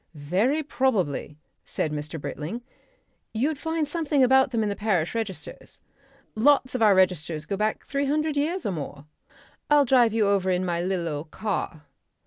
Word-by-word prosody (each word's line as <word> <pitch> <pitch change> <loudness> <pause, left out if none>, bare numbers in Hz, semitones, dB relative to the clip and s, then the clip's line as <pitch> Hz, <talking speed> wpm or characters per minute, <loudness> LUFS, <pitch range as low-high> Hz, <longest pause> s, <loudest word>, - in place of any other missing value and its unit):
"Very 195 - 0
probably," 220 - -1 0.3
said 155 - -2
Mr. 150 +2 -5
Britling, 150 - -5 0.7
"you'd 280 +6 0
find 320 -1 -1
something 295 -3 +1
about 265 +1 +5
them 230 -3 0
in 210 - 0
the 200 - -2
parish 195 -7 0
registers. 220 -5 -6 0.5
Lots 255 +3 +3
of 255 - -2
our 210 -3 +6
registers 170 -4 +1
go 200 - -2
back 215 +2 -1
three 280 0 -1
hundred 305 +1 0
years 330 +6 -1
or 205 - 0
more. 145 -3 -6 0.6
I'll 295 -1 +5
drive 245 -3 +4
you 220 -1 +2
over 200 -2 +2
in 185 0 +1
my 170 -1 -1
lil' 180 -1 -1
old 150 0 -4
car." 185 -6 -3
215 Hz, 165 wpm, -25 LUFS, 175-270 Hz, 0.7 s, our